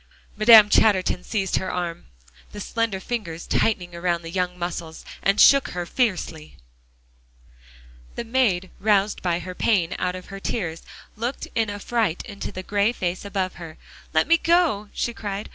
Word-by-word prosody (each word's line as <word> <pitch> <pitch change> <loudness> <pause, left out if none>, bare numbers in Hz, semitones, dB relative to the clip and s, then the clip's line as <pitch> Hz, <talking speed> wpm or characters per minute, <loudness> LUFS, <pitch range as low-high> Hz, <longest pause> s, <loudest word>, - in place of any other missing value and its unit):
Madame 215 0 +8
Chatterton 195 -4 +3
seized 195 -4 -1
her 190 - -3
arm, 175 -1 -4 0.5
the 205 - -7
slender 225 -1 -2
fingers 185 -7 -5
tightening 180 -6 0
around 170 0 -1
the 165 - -7
young 180 0 -2
muscles, 170 -2 -5 0.2
and 195 +1 +2
shook 275 -1 +7
her 175 0 -4
fiercely. 175 -8 -2 1.6
The - - -3
maid 225 -7 +1
roused 205 -1 +2
by 175 -2 0
her 185 +1 -7
pain 180 -3 +1
out 180 0 -1
of 185 - -8
her 195 - -6
tears 175 -6 -3 0.3
looked 240 +5 -4
in 225 -2 0
affright 205 -2 -1
into 200 -4 -7
the 185 - -7
gray 205 +3 +1
face 180 -5 -3
above 195 -2 -2
her. 160 -2 -9 0.3
"Let 155 - +3
me 335 +1 +4
go," 330 - +2
she 235 - -2
cried. 205 -2 -5
195 Hz, 160 wpm, -23 LUFS, 175-220 Hz, 1.6 s, Madame